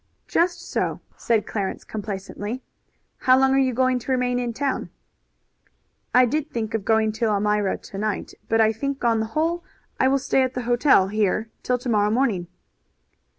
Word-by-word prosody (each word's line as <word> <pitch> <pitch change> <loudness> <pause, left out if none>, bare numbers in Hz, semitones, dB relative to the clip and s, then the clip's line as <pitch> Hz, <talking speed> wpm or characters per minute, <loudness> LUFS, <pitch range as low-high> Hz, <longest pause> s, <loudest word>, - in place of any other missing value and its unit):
"Just 345 +1 0
so," - - -1 0.2
said 225 -2 +1
Clarence 200 -3 -3
complacently. 205 +3 -5 0.5
"How 255 0 +4
long 265 0 +4
are 270 - +4
you 260 -1 +2
going 255 +1 +2
to 255 - -5
remain 250 -1 +1
in 240 -1 -2
town?" 275 +3 -2 1.2
"I 250 0 +6
did 305 +5 -1
think 225 -2 -3
of 225 -3 -1
going 220 0 +2
to 220 +2 -2
Elmira 210 -1 +1
to 195 - -10
night, 215 -1 -2 0.2
but 225 - +2
I 220 0 +4
think 275 +4 -4
on 230 -1 +3
the 220 - -1
whole 335 +2 0 0.4
I 260 - +4
will 275 +1 +3
stay 270 0 +1
at 260 0 -1
the 250 - -2
hotel 240 -5 +4
here 215 +1 0
till 250 - 0
to 250 - -8
morrow 210 -3 +2
morning." 215 -7 +1
235 Hz, 180 wpm, -23 LUFS, 215-260 Hz, 1.2 s, I